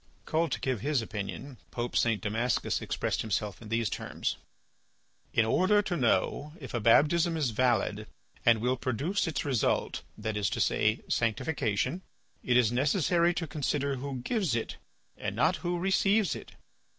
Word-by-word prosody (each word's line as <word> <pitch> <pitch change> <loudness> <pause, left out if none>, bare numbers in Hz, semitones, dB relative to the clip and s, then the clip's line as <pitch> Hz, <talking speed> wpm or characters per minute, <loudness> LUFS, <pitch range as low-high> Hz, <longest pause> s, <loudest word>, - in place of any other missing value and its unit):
Called 160 -1 0
to - - -2
give 130 -6 -1
his 140 -3 +1
opinion, 110 +6 -6
Pope 120 0 -4
St. 115 -3 +2
Damascus 115 +3 0
expressed - - -1
himself 105 -1 -2
in 110 - -10
these 115 0 +1
terms: - - -3 0.9
"In 115 - +3
order 190 - +3
to 180 - -2
know 145 +2 +1
if 135 - -9
a 120 - 0
baptism 160 +9 +4
is 145 -7 0
valid 110 -3 +1 0.4
and 115 -2 +4
will 125 +2 +1
produce 140 - -1
its 155 -5 -2
result, 130 -6 0 0.2
that 110 0 -3
is 105 -2 +1
to - - -3
say, 110 +1 +2
sanctification, 115 - 0 0.4
it 125 -1 +2
is 120 -3 +4
necessary 170 +6 +2
to 170 - -2
consider 140 -2 -1
who 130 -1 -5
gives 190 - 0
it 115 - -3 0.4
and - - -4
not - - +2
who 175 0 -2
receives 195 +3 +2
it. - - -10
130 Hz, 160 wpm, -29 LUFS, 115-160 Hz, 0.9 s, baptism